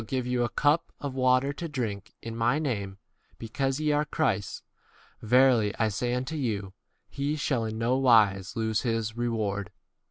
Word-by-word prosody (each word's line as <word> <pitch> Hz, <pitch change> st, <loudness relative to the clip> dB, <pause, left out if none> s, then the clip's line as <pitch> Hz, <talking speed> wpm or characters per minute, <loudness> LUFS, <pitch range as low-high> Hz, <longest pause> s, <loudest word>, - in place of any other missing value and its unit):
give 130 Hz, +1 st, -2 dB
you 125 Hz, -1 st, 0 dB
a 120 Hz, -, -1 dB
cup 150 Hz, +7 st, +1 dB
of 140 Hz, -2 st, -4 dB
water 130 Hz, +1 st, +2 dB
to 170 Hz, +4 st, -5 dB
drink 110 Hz, -9 st, -4 dB
in 115 Hz, -1 st, -6 dB
[my] 115 Hz, +3 st, +2 dB
u -, -, 0 dB
name, 100 Hz, -10 st, -3 dB, 0.4 s
because 135 Hz, +4 st, -2 dB
ye 155 Hz, -1 st, +1 dB
are 150 Hz, 0 st, +2 dB
Christ's, 150 Hz, -10 st, -1 dB, 0.6 s
verily 120 Hz, -2 st, +4 dB
I 110 Hz, -1 st, +2 dB
say 120 Hz, +4 st, -1 dB
unto 130 Hz, +5 st, -3 dB
you, 105 Hz, -9 st, -3 dB, 0.3 s
he 140 Hz, +2 st, -2 dB
shall 130 Hz, -6 st, -1 dB
in 110 Hz, 0 st, -4 dB
no 115 Hz, +3 st, +1 dB
wise 105 Hz, -7 st, +3 dB
lose 110 Hz, -1 st, 0 dB
his 115 Hz, -2 st, -2 dB
reward. 110 Hz, -5 st, -2 dB
120 Hz, 170 wpm, -27 LUFS, 110-135 Hz, 0.6 s, verily